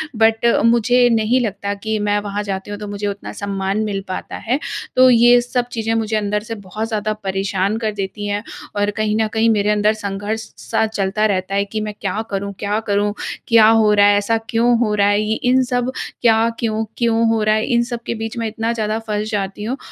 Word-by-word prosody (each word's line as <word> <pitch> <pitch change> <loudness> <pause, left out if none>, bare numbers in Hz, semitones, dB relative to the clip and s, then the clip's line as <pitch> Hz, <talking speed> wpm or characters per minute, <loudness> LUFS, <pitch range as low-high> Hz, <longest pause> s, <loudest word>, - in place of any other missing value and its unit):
But 225 +1 +3 0.2
मुझे 240 +2 +4
नहीं 230 +2 +2
लगता 200 -2 -2
कि 220 +2 -3
मैं 205 0 +1
वहाँ 205 0 -3
जाती 195 0 -5
हूँ, 205 - -4
तो 210 - -6
मुझे 205 0 -4
उतना 200 0 -5
सम्मान 195 0 -2
मिल 200 -2 -2
पाता 185 - -5
है। 255 +5 +1 0.4
तो 255 0 +7
ये 240 0 +6
सब 245 0 -2
चीज़ें 225 -1 -1
मुझे 220 -1 -1
अंदर 210 0 -1
से 225 0 -6
बहुत 210 +2 -5
ज़्यादा 215 -1 -1
परेशान 195 +1 -1
कर 220 -2 -1
देती 205 +1 -4
हैं 205 +1 -2 0.3
और 205 0 +1
कहीं 215 -1 0
न 220 - +1
कहीं 225 0 +3
मेरे 210 -1 +2
अंदर 210 +1 +2
संघर्ष 205 +1 -4 0.2
सा 220 - 0
चलता 210 0 -1
रहता 195 -1 -1
है 200 - +1
कि 215 +1 -4
मैं 210 -1 -4
क्या 195 +2 -2
करूँ 200 0 -3
क्या 205 +1 -1
करूँ? 205 0 +1 0.3
क्या 225 -2 +6
हो 220 -2 +4
रहा 205 0 +5
है? 205 0 +5
ऐसा 225 +3 +1
क्यों 235 +1 +3
हो 215 -3 +1
रहा 200 -1 +3
है? 205 +1 +2
ये 215 +1 0
इन 255 +1 +4
सब 245 +1 0 0.3
क्या 225 -1 +4
क्यों-क्यों 225 +1 0
हो 225 -1 +1
रहा 215 0 +3
है, 215 - 0
इन 235 -1 +2
सब 235 - -3
के - - -2
बीच 225 +1 -5
मैं 230 - -1
इतना 225 +1 -2
ज़्यादा 215 -1 -1
फँस 210 0 -2
जाती 200 0 -3
हूँ 245 +5 -3
215 Hz, 220 wpm, -19 LUFS, 205-225 Hz, 0.4 s, तो